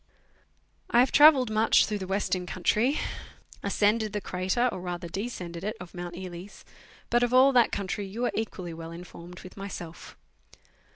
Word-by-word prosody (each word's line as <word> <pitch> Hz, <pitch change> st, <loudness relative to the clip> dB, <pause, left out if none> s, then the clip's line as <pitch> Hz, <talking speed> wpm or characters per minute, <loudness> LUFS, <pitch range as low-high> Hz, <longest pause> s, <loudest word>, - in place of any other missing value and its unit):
I -, -, +2 dB
have 250 Hz, +1 st, +4 dB
travelled 285 Hz, -6 st, +7 dB
much 215 Hz, +1 st, +4 dB
through 210 Hz, -1 st, -3 dB
the 190 Hz, -, -5 dB
Western 190 Hz, -2 st, -1 dB
country, 215 Hz, -, +1 dB, 0.6 s
ascended 210 Hz, +1 st, +1 dB
the 210 Hz, -, -1 dB
crater 190 Hz, +6 st, 0 dB
(or -, -, -5 dB
rather 175 Hz, -1 st, -5 dB
descended 180 Hz, -3 st, -5 dB
it) 215 Hz, +2 st, -3 dB
of 180 Hz, -1 st, -10 dB
Mount 175 Hz, -1 st, -6 dB
Eeles; 180 Hz, +1 st, -9 dB, 0.5 s
but 240 Hz, -, +4 dB
of 245 Hz, +1 st, +2 dB
all 265 Hz, +2 st, +7 dB
that 245 Hz, -3 st, +4 dB
country 200 Hz, 0 st, -3 dB
you 230 Hz, +6 st, -3 dB
are -, -, 0 dB
equally 185 Hz, -6 st, -4 dB
well 165 Hz, 0 st, -8 dB
informed 175 Hz, +1 st, -10 dB
with 185 Hz, -, -12 dB
myself. 180 Hz, -4 st, -8 dB
195 Hz, 165 wpm, -27 LUFS, 180-225 Hz, 0.6 s, travelled